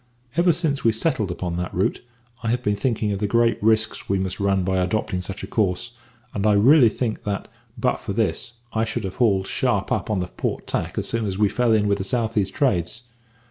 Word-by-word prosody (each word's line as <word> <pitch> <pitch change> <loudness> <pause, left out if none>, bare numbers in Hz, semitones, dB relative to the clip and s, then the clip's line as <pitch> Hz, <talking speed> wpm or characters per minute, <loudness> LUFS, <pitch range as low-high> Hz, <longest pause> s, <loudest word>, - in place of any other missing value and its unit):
Ever 170 +1 +4
since 155 -5 -1
we 115 - +4
settled 115 - 0
upon 85 -1 -3
that 90 +1 -3
route, 95 - 0 0.4
I 115 - -4
have 120 +2 0
been 105 0 +1
thinking 110 -1 0
of 100 - -2
the 105 - 0
great 115 +2 +2
risks 110 +1 +1
we 100 - +2
must 95 -1 -3
run 100 -1 +2
by 95 +1 0
adopting 90 0 0
such 95 +1 -6
a - - -5
course, 105 +3 -1 0.4
and 100 - -2
I 105 - +5
really 120 +5 +6
think 110 0 -3
that, 100 -1 -3 0.3
but - - +1
for - - -6
this, 120 - -1 0.2
I 110 - +1
should 115 +1 -3
have 95 -1 -5
hauled 100 -6 +3
sharp - - 0
up - - 0
upon 105 -3 +1
the 90 - -1
port - - -4
tack - - -3
as - - -1
soon 115 -2 -1
as 95 -1 -3
we 105 -1 +3
fell 125 +1 +1
in 105 -2 +3
with 100 0 +1
the - - -1
south 115 +2 -1
east 100 -3 0
trades. 115 - 0
105 Hz, 230 wpm, -23 LUFS, 95-115 Hz, 0.4 s, really